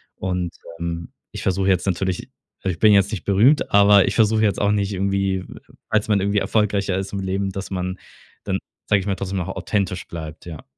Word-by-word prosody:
Und, 90 -2 -2 0.3
ähm, 85 0 -4 0.2
ich - - -7
versuche 95 +1 +1
jetzt 95 0 +1
natürlich 95 0 -1 0.3
a 95 - 0
ich 90 - -2
bin 110 -1 +6
jetzt 100 0 +4
nicht 95 -8 -4
berühmt, 110 +10 +4
aber 100 -1 +6
ich - - 0
versuche 110 -1 +3
jetzt 100 -4 +1
auch 100 - +3
nicht 100 -1 0
irgendwie, 95 0 0 0.5
als 110 -1 +1
man 105 -1 +3
irgendwie 100 +1 0
erfolgreicher 100 -3 +1
ist 95 0 -4
im 100 - -2
Leben, 95 +1 -1
dass 95 +1 -6
man 90 0 -3 0.5
dann, - - -1 0.3
sag 100 - +4
ich 95 - -5
mal: 100 - 0
„Trotzdem 95 0 -4
noch 90 - -3
authentisch 95 -4 -2
bleibt“, 80 -1 -8
ja. 80 -4 -8
95 Hz, 205 wpm, -22 LUFS, 90-100 Hz, 0.5 s, bin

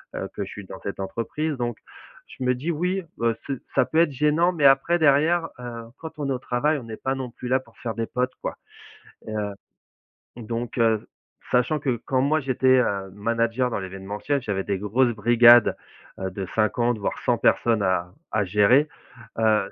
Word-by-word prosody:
heu, - - -3
que - - -2
je - - -8
suis 105 - -9
dans 95 - -10
cette 100 - -6
entreprise. 115 +10 -3
Donc, 120 -2 -3 0.6
je 130 - -3
me 125 - +3
dis: 145 +8 -2
«Oui, 180 +4 -1
bah, 115 0 +1
c'est 140 - -1 0.2
ça - - +4
peut 160 - 0
être 170 -2 +4
gênant». 150 +6 +2
Mais, 150 -5 0
après, 140 +6 +5
derrière, 160 +3 +3
heu, 120 -1 -7
quand 160 -1 -8
on 145 - -2
est - - +1
au 125 - -3
travail, 140 +5 0
on 135 - -7
n'est 110 -1 -8
pas 135 0 -2
non 130 -2 -5
plus 125 - -8
là 130 +1 +2
pour - - -23
faire 115 -2 -4
des 115 - -2
potes, 125 +1 -1
quoi - - -4 0.7
et 110 - -6
heu, 105 -1 -3 0.8
donc, 115 +1 -5
heu, 115 -2 +2 0.4
sachant 125 +5 +2
que, 130 -5 -2
quand 130 - +1
moi 150 +3 +2
j'étais, 130 -1 +3
heu, 100 -5 -1
manager 115 +4 0
dans 115 - -2
l'événementiel, 100 +9 -3
j'avais 100 -5 -2
des 100 -2 -1
grosses 120 +5 +2
brigades, 120 +2 +6 0.4
heu, 95 - -2
de 95 +1 -5
50 120 +2 +1
voire 100 - -3
100 - - +3
personnes 115 -3 +2
à 90 -2 0 0.2
à 105 -1 +2
gérer, 105 - +4 0.5
heu, 110 -3 +2
120 Hz, 200 wpm, -24 LUFS, 105-135 Hz, 0.8 s, brigades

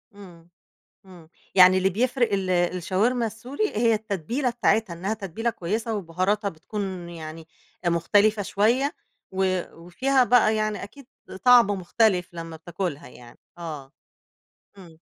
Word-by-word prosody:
إمم، 175 -4 -14 0.6
إمم 175 -4 -15 0.3
يعني 185 0 +8
اللي 190 +1 +2
بيفرِق 240 +2 0
ال 195 -2 -1
الشاورما 185 +7 +1
السوري 245 - -3
هي 230 +1 +3
التتبيلة 220 - -2
بتاعتها، 225 -5 +1
إنها 190 +5 -3
تتبيلة 220 +2 -3
كويسة 220 +3 -3
وبُهاراتها 200 +3 -1
بتكون 185 +1 -6
يعني 160 -1 -9 0.4
مختلفة 205 +5 +3
شوية 235 +9 +1 0.4
و 185 -1 0
وفيها 255 +11 +1
بقى 240 -3 +4
يعني 215 -1 -2
أكيد 255 +6 -12 0.4
طعم 245 -3 +7
مختلف 190 -1 +1
لمّا 165 -1 -7
بتاكلها 170 -2 -5
يعني، 120 -1 -15 0.2
آه، 150 -6 -7 0.9
إمم. 170 -4 -15
195 Hz, 125 wpm, -25 LUFS, 175-225 Hz, 0.9 s, يعني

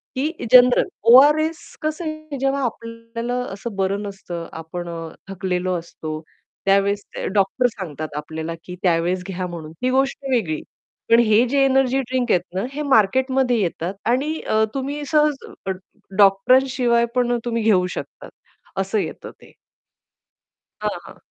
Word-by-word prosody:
की 280 +5 0 0.2
general 250 0 +7 0.3
ORS 310 +4 +6 0.2
कसं 310 +3 -2
आहे 310 -2 -5
जेव्हा 275 +1 0
आपल्याला 230 0 -4 0.2
असं 205 +2 -6
बरं 195 +1 0
नसतं, 190 -4 -6
आपण 165 +2 -6
अ, 165 -1 -6 0.2
थकलेलो 185 -1 -2
असतो 155 -2 -7 0.5
त्यावेळेस 200 +1 +2
ते - - -4
डॉक्टर 200 +6 +2
सांगतात 160 - -6
आपल्याला 160 +2 -5
की 180 +2 -8
त्यावेळेस 175 +1 +1
घ्या 185 -1 -3
म्हणून 165 -3 -8
ही 255 - +3
गोष्ट 270 +2 0
वेगळी. 180 -12 0 0.5
पण 230 - +7
हे 225 0 +4
जे 275 +2 +3
एनर्जी 270 -1 +3
ड्रिंक 255 -1 -1
आहेत 180 - +4
ना 190 - 0
हे 295 - -3
मार्केटमध्ये 260 0 +3
येतात 175 -1 -2 0.2
आणि 290 +6 0
अ, 220 0 +1
तुम्ही 280 +2 -3
सहज 300 0 +3 0.3
अ, - - +1 0.5
डॉक्टर 200 +5 +6
शिवाय 235 -2 +2
पण 245 -1 +2
तुम्ही 230 -1 -1
घेऊ 195 -5 +4
शकता, - - -8 0.5
असं 195 +3 0
येतं - - -5
ते. - - -17 1.3
हां, - - 0 0.2
हां. - - -12
230 Hz, 145 wpm, -21 LUFS, 185-260 Hz, 1.3 s, general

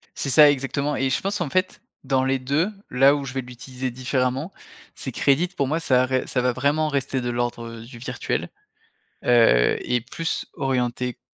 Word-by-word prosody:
C'est 140 - -3
ça 150 +2 +8
exactement 140 +2 -2
et 135 0 0
je 130 - +1
pense 200 +2 -2
qu'en 175 -6 -2
fait, 185 +3 -1 0.2
dans 130 -1 +1
les 135 0 +1
2 140 +8 0 0.2
là 135 +3 +5
où 140 -1 -4
je 130 - -6
vais 135 - -2
l'utiliser 125 +1 -6
différemment 130 +4 -1 0.4
c'est - - -6
que - - -5
Reddit, 140 +6 +4
pour 140 - +1
moi, 160 +4 0
ça 130 -5 +3
à - - +2
ré 130 0 -1
ça 125 - 0
va 125 - +2
vraiment 145 +4 +1
rester 135 -2 -1
de 120 - -2
l'ordre, 120 -1 -2 0.2
heu, - - -11
du 120 -1 -12
virtuel. 125 0 -3 0.8
Heu, 115 - +5
et 125 - 0
plus 160 +7 -3
orienté 125 -2 -2
130 Hz, 200 wpm, -23 LUFS, 125-140 Hz, 0.8 s, ça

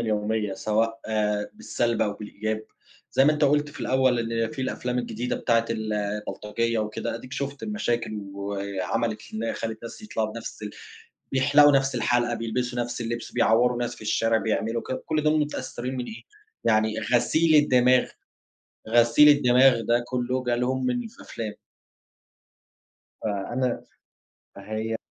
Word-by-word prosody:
اليومية 105 -2 -1
سواء 115 +3 0 0.5
بالسلب 120 - -1
أو 105 - 0
بالإيجاب، 110 +1 -4 0.5
زي 135 - +5
ما 150 - +5
أنت 150 -1 +1
قُلت 145 +1 +3
في - - -11
الأول 130 -2 +2
إن 115 0 -1
في 135 -4 -5
الأفلام 125 -1 -2
الجديدة 125 0 -2
بتاعة 115 -1 +2
ال 110 -1 -2
البلطجية 105 +2 -2
وكده، 105 0 -3
أديك 125 +3 -9
شُفت 140 0 -4
المشاكل 120 - -1 0.2
وعَمَلِت 100 +2 -2
إنها 115 +1 -2
خلت 110 -1 -5
ناس 115 - -9
يطلعوا 110 - -2
بنَفْس 115 -1 -8
ال 105 - -4 0.6
بيحلقوا 145 +2 +6
نَفْس 135 -1 -1
الحلقة، 120 0 +1
بيلبسوا 120 +2 -2
نَفْس 120 0 -3
اللبس، 120 0 -4
بيعوروا 120 +2 +3
ناس 120 -1 -2
في - - -16
الشارع، 115 +1 +2
بيعملوا 110 +1 -1
ك 130 - -5
كل 155 -1 0
ده 155 0 +3
متأثرين 130 -3 -3
من 125 - -3
إيه؟ 220 - -9 0.4
يعني 110 0 +2
غسيل 155 +8 +3
الدماغ، 125 -2 +4 0.8
غسيل 120 +5 +6
الدماغ 130 -3 +5
ده 120 +2 +1
كله 125 +1 -1
جه 120 -1 +1
لهم 130 +1 0
من 120 -2 -1
ف - - -20
الأفلام. 110 -2 -6 1.7
فأنا 120 +5 -2 0.7
فهي 110 +3 -3
120 Hz, 145 wpm, -25 LUFS, 110-130 Hz, 1.7 s, بيحلقوا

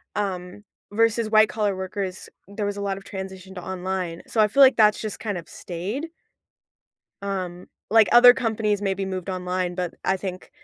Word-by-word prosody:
Um, 190 -1 -4 0.3
versus 230 0 +2
white 215 0 +5
collar 210 -3 0
workers, 190 0 -5 0.2
there 200 +1 -4
was 205 0 -3
a 200 - -4
lot 195 -1 -2
of 195 - -11
transition 190 0 -8
to 180 - -7
online. 185 -2 -4
So, 220 - +1
I 210 - +5
feel 275 +7 +3
like 265 - +6
that's 210 -2 +4
just 215 -2 -5
kind 205 -5 -3
of 165 - -9
stayed. 200 - -5 1.1
Um, 185 -3 -4 0.2
like, 220 0 +6
other 245 +1 +9
companies 220 -4 -1
maybe 195 -1 -1
moved 185 0 -4
online, 180 -1 -2
but 180 -2 -3
I 190 - +2
think 185 -1 -7
195 Hz, 180 wpm, -24 LUFS, 185-215 Hz, 1.1 s, other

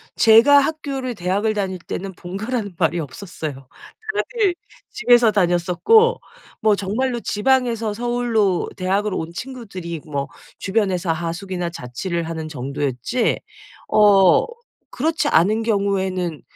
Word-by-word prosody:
제가 230 +6 +7
학교를 275 -4 -3
대학을 200 +4 0
다닐 190 -3 -2
때는 190 +2 -6
본가라는 200 +3 -4
말이 170 +1 +1
없었어요. 145 -3 -7 0.5
다들 415 -5 0 0.3
집에서 240 -1 +4
다녔었고 200 - +3 0.4
뭐 215 -1 +4
정말로 235 +6 -2
지방에서 230 -1 0
서울로 230 -4 0
대학을 195 +2 0
온 165 -2 -4
친구들이 190 - -7
뭐 140 -3 -3 0.3
주변에서 190 -4 0
하숙이나 175 +2 -3
자취를 170 +4 -4
하는 160 -1 -5
정도였지 140 - -2 0.5
어 200 -4 +5 0.5
그렇지 315 +2 0
않은 210 +7 +3
경우에는 190 -6 -1
200 Hz, 285 characters per minute, -21 LUFS, 175-235 Hz, 0.5 s, 제가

